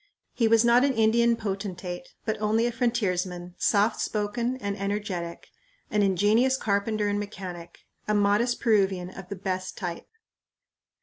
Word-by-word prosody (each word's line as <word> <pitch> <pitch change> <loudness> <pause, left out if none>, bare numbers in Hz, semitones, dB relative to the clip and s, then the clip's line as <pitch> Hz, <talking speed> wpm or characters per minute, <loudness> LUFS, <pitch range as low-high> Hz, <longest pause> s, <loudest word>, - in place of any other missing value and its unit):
He 230 - +2
was 225 +1 +5
not 240 +2 +5
an 280 -1 +2
Indian 230 +1 +4
potentate, 195 -1 -5 0.2
but 220 - 0
only 220 +2 +2
a 240 - +1
frontiersman, 185 -7 -1
soft 210 +1 +2
spoken 235 +4 -1
and 200 -5 -3
energetic, 200 -4 -4 0.4
an 210 - +2
ingenious 210 +7 +3
carpenter 210 -1 0
and 205 0 0
mechanic, 180 -4 -7 0.3
a 210 - +1
modest 205 +4 +2
Peruvian 195 -5 +1
of 190 -1 -10
the 200 - -4
best 185 -1 -4
type. 175 -4 -5
205 Hz, 140 wpm, -26 LUFS, 190-225 Hz, 0.4 s, was